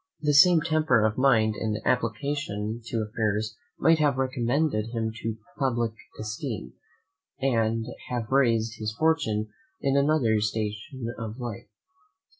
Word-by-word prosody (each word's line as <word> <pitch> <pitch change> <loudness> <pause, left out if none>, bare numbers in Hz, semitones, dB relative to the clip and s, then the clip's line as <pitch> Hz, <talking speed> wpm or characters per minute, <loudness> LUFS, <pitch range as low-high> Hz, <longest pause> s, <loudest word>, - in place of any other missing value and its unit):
The 150 -1 +2
same 165 +3 +7
temper 155 -9 +3
of 110 +2 0
mind 115 -5 +4
and 105 0 -2
application 115 -2 -1
to 115 -1 -1
affairs 110 0 -1 0.2
might 165 -1 +4
have 145 -3 +2
recommended 130 -2 0
him 115 -1 -2
to 110 0 -3
the - - -15 0.2
publick 120 -4 0 0.3
esteem, 105 - -5 0.7
and 115 -4 +1 0.2
have 120 -2 -3
raised 115 -4 +2
his 110 0 -3
fortune 145 -10 +1 0.3
in 135 0 +1
another 140 -7 +3
station 110 +4 -3
of 110 0 -5
life. 120 -5 -6
115 Hz, 130 wpm, -27 LUFS, 110-135 Hz, 0.7 s, same